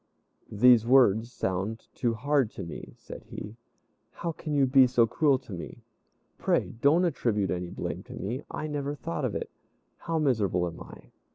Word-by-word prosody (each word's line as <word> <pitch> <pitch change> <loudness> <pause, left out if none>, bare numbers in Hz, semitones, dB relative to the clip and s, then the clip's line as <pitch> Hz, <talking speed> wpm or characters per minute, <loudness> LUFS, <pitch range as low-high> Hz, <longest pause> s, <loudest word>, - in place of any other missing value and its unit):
"These 115 +1 +5
words 120 -3 +4
sound 95 +4 -3
too 120 -2 -1
hard 140 0 +1
to 100 - -6
me," 85 - -9
said - - -10
he. 105 +2 -8 0.5
"How 170 - -4
can 155 -1 -7
you 140 -1 +4
be 130 0 +6
so 120 -2 +4
cruel 140 +3 +2
to 125 -6 -11
me? 85 - -8 0.6
Pray - - +1
don't 160 +6 +4
attribute 110 - 0
any 90 -1 -3
blame - - -5
to - - -10
me; 115 +9 -4
I 155 - -5
never 145 -1 -3
thought 85 - -4
of - - -2
it. - - -4 0.5
How 165 -1 -3
miserable 105 - +1
am 85 -1 -7
I!" - - -13
120 Hz, 175 wpm, -28 LUFS, 100-140 Hz, 0.6 s, be